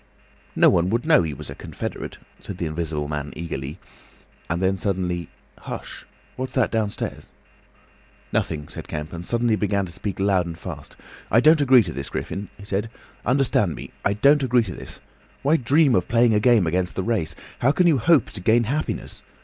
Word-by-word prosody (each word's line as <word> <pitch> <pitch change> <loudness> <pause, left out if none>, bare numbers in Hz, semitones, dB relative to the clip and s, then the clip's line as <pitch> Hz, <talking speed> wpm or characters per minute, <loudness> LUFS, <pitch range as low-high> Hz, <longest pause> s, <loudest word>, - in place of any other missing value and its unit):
"No - - +6
one 85 +1 +2
would 115 +6 0
know 155 -1 +6
he 80 -4 -3
was - - -8
a - - -5
confederate," - - -6 0.2
said 95 - -8
the 85 - -2
Invisible 80 -2 -3
Man, 75 -1 -4
eagerly. 75 -2 -5 0.7
And 85 +1 0
then 95 +1 +2
suddenly, 90 -3 -2 0.3
"Hush! - - -7 0.3
What's 130 0 -4
that 130 -3 +2
downstairs?" 110 -3 -3 1.0
"Nothing," 75 -2 -1
said - - -9
Kemp, 75 +1 -5
and 85 0 -6
suddenly 120 +2 +1
began 100 -2 0
to 85 - -9
speak 100 +3 -5
loud 95 -3 +2
and 85 -1 -6
fast. - - -8 0.3
"I 115 - +5
don't 155 +4 +6
agree 130 -4 +6
to 85 -4 -6
this, 70 0 -5
Griffin," 100 +1 -4
he 100 - -11
said. 100 +2 -2 0.4
"Understand 125 - +2
me, - - -9
I 100 - +2
don't 140 +8 +4
agree 125 -2 +3
to 95 -5 -6
this. - - -10 0.4
Why 150 +4 +4
dream 140 +1 +3
of 90 -6 +2
playing 120 0 +4
a 105 - +4
game 115 -4 +4
against 90 +2 -1
the 95 - -1
race? 95 -9 -1 0.2
How 130 - +4
can 180 +4 +2
you 160 -6 +4
hope 155 0 +3
to 100 - -7
gain 115 +4 +4
happiness? 145 +7 -3
100 Hz, 190 wpm, -23 LUFS, 85-120 Hz, 1.0 s, No